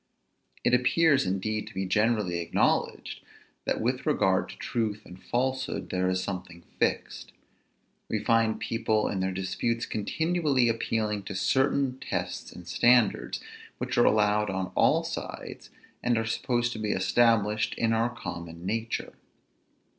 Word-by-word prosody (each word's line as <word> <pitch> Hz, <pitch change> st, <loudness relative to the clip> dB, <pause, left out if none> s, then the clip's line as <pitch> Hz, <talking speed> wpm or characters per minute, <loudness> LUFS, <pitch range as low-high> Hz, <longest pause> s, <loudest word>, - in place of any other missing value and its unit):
It 120 Hz, -, +2 dB
appears, 135 Hz, -, +4 dB
indeed, 105 Hz, +3 st, -2 dB
to -, -, -11 dB
be 95 Hz, 0 st, -1 dB
generally 105 Hz, -2 st, +1 dB
acknowledged, 85 Hz, -, 0 dB, 0.5 s
that -, -, 0 dB
with -, -, -1 dB
regard -, -, +2 dB
to -, -, -10 dB
truth 110 Hz, -3 st, -2 dB
and 90 Hz, +1 st, -12 dB
falsehood 130 Hz, +5 st, -2 dB
there 90 Hz, 0 st, +1 dB
is 95 Hz, 0 st, 0 dB
something 90 Hz, -3 st, -6 dB, 0.2 s
fixed. -, -, -1 dB, 0.8 s
We 110 Hz, -, 0 dB
find 115 Hz, 0 st, +2 dB
people 110 Hz, -2 st, 0 dB
in 95 Hz, -, -2 dB
their 95 Hz, 0 st, 0 dB
disputes 115 Hz, +5 st, -2 dB
continually 145 Hz, -, +1 dB
appealing 110 Hz, -2 st, -1 dB
to 100 Hz, -, -5 dB
certain 130 Hz, +5 st, +1 dB
tests -, -, -4 dB
and 90 Hz, -1 st, -12 dB
standards, 120 Hz, +5 st, +3 dB, 0.4 s
which -, -, -3 dB
are -, -, +5 dB
allowed 105 Hz, 0 st, +3 dB
on 95 Hz, -1 st, -3 dB
all -, -, +3 dB
sides, -, -, -6 dB, 0.3 s
and 120 Hz, -1 st, +2 dB
are 115 Hz, -, 0 dB
supposed 120 Hz, +1 st, 0 dB
to 110 Hz, -, -6 dB
be 105 Hz, -1 st, 0 dB
established 110 Hz, +1 st, +2 dB
in 115 Hz, -1 st, +1 dB
our 115 Hz, +2 st, +2 dB
common 85 Hz, -7 st, -7 dB
nature. 115 Hz, +3 st, -2 dB
110 Hz, 140 wpm, -28 LUFS, 95-120 Hz, 0.8 s, are